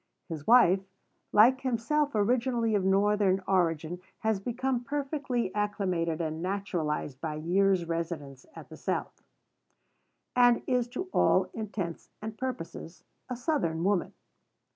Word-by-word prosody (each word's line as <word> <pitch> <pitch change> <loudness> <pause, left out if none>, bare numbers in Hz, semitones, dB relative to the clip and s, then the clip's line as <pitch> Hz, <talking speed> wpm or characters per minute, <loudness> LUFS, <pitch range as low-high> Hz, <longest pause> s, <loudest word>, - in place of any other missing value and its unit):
His 155 -3 -6
wife, 225 -6 +6 0.5
like 245 +5 +6
himself 275 +4 0
originally 230 +1 +1
of 200 -2 +2
Northern 195 0 +2
origin, 175 -2 0 0.2
has 220 -2 +1
become 245 +3 -2
perfectly 275 -5 -2
acclimated 185 -6 -1
and 160 -1 -3
naturalized 170 -7 -2
by 155 -2 -3
years' 180 +3 +2
residence 165 -5 -4
at - - -11
the - - -10
South; - - -3 1.1
and 245 -1 +5
is 250 -2 +1
to 245 - -4
all - - +3
intents 200 -6 -5
and 215 0 -6
purposes, 185 -8 -6 0.3
a 250 - -2
Southern 235 - -1
woman. 195 -1 +1
200 Hz, 120 wpm, -29 LUFS, 170-240 Hz, 1.1 s, wife